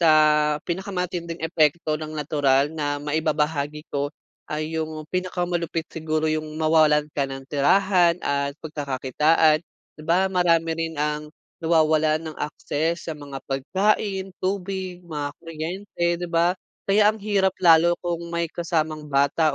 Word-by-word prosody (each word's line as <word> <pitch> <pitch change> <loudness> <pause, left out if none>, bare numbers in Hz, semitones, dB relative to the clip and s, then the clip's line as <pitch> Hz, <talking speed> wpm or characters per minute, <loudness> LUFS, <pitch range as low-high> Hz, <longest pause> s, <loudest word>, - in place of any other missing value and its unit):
sa 165 -2 +5 0.6
pinakamatinding 180 -2 -3
epekto 160 -1 +1
ng 155 0 -5
natural 145 -1 +2
na 145 -2 -1
maibabahagi 150 0 -1
ko 145 0 -1 0.4
ay 155 +1 -3
yung 155 -1 -4
pinakamalupit 175 -2 -2
siguro 155 -1 -2
yung 155 0 -2
mawalan 155 -2 +4
ka 140 - +1
ng 135 0 -7
tirahan 175 +4 +3
at 140 0 -1
pagkakakitaan. 150 +2 +2 0.3
Di 155 - -12
ba 175 +4 +2
marami 170 -3 +2
rin 165 0 -3
ang 150 0 -2 0.3
nawawalan 155 -1 +3
ng 155 - -9
access 160 +3 -2
sa - - -1
mga 145 -2 -8
pagkain, 190 +7 0
tubig, 190 -1 -3
mga 150 -3 -3
kuryente, 170 +3 -4
di 175 - -3
ba? 170 +1 +3 0.3
Kaya 205 +1 +4
ang 215 - +1
hirap 195 -3 +1
lalo 170 0 +6
kung 170 -1 -1
may 170 0 -1
kasamang 155 -3 -2
bata 140 +2 +2
160 Hz, 130 wpm, -24 LUFS, 150-175 Hz, 0.6 s, lalo